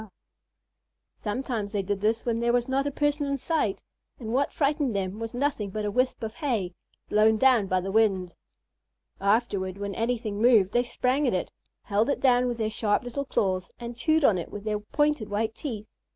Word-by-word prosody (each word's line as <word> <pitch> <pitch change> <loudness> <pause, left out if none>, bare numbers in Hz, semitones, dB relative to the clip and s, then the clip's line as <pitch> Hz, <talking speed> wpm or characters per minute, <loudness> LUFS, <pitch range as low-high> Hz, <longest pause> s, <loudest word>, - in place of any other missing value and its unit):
Sometimes 220 -2 -3
they 200 -2 0
did 200 0 -2
this 220 +2 +1
when 230 -1 0
there 235 0 +2
was 245 0 +1
not 270 +2 0
a - - -1
person 290 0 0
in 280 0 0
sight 275 - -1 0.4
and 225 -2 -5
what 275 +2 +1
frightened 285 -5 0
them 195 +1 -2
was 225 +1 -5
nothing 245 -6 -1
but 210 +2 -3
a 205 - -1
wisp 255 +1 0
of 220 -1 -4
hay, 230 - -2 0.3
blown 215 +1 +4
down 240 -4 +4
by 185 0 +1
the 195 +2 -4
wind. 195 -5 +2 0.9
Afterward, 200 -3 +1
when 200 0 -4
anything 225 -2 -2
moved, 220 -5 +5
they 240 - +4
sprang 255 +3 0
at 235 - +1
it, 180 - -2 0.3
held 210 +5 +1
it 280 - 0
down 250 -1 +4
with 240 -1 -2
their 220 -1 -1
sharp 215 +2 +1
little 260 +3 -4
claws, 185 -7 0
and 240 0 -6
chewed 315 +4 +2
on 195 -7 +4
it 170 - -6
with 205 - -7
their 210 -1 -1
pointed 295 +1 0
white 220 +2 -1
teeth. 225 -6 -5
225 Hz, 195 wpm, -27 LUFS, 205-255 Hz, 0.9 s, moved